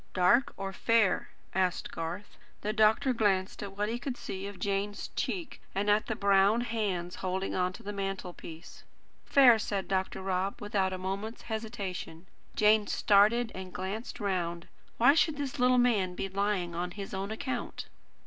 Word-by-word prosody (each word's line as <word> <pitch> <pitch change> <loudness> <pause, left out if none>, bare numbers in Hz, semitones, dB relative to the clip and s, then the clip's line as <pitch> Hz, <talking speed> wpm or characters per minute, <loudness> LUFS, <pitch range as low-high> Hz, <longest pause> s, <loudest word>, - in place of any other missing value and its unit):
"Dark 240 +10 +4
or 195 0 -4
fair?" 230 -1 +2 0.2
asked 185 -1 0
Garth. 170 +5 -5 0.3
The 210 +1 -1
doctor 220 +5 +4
glanced 195 -4 +1
at 200 -1 -7
what 205 0 0
he 235 +2 -2
could 250 0 -4
see 190 +1 -5
of 200 -1 -8
Jane's 200 +2 -2
cheek, 345 -5 -4
and 205 +1 +2
at 210 +1 +2
the 220 - -1
brown 200 +2 +4
hands 200 -7 -2
holding 190 +1 -2
on 180 0 +1
to 230 - -11
the 205 0 -5
mantelpiece. 185 -4 -6 0.4
"Fair," 250 -5 +7
said 200 -2 -2
Dr. 190 0 -1
Rob, 190 +1 -1
without 200 -2 0
a 185 - -3
moment's 195 +5 -4
hesitation. 210 -7 -5 0.3
Jane 210 0 +4
started 220 +3 +4
and 185 0 -7
glanced 195 +6 -5
round. 175 -4 -2 0.3
Why 245 +4 +6
should 315 -1 +2
this 280 -3 -4
little 250 0 +4
man 210 -7 +2
be 195 - -2
lying 195 -2 -1
on 175 +1 -2
his 195 +2 -7
own 195 +1 -3
account? 240 +3 -4
200 Hz, 165 wpm, -30 LUFS, 190-220 Hz, 0.4 s, Fair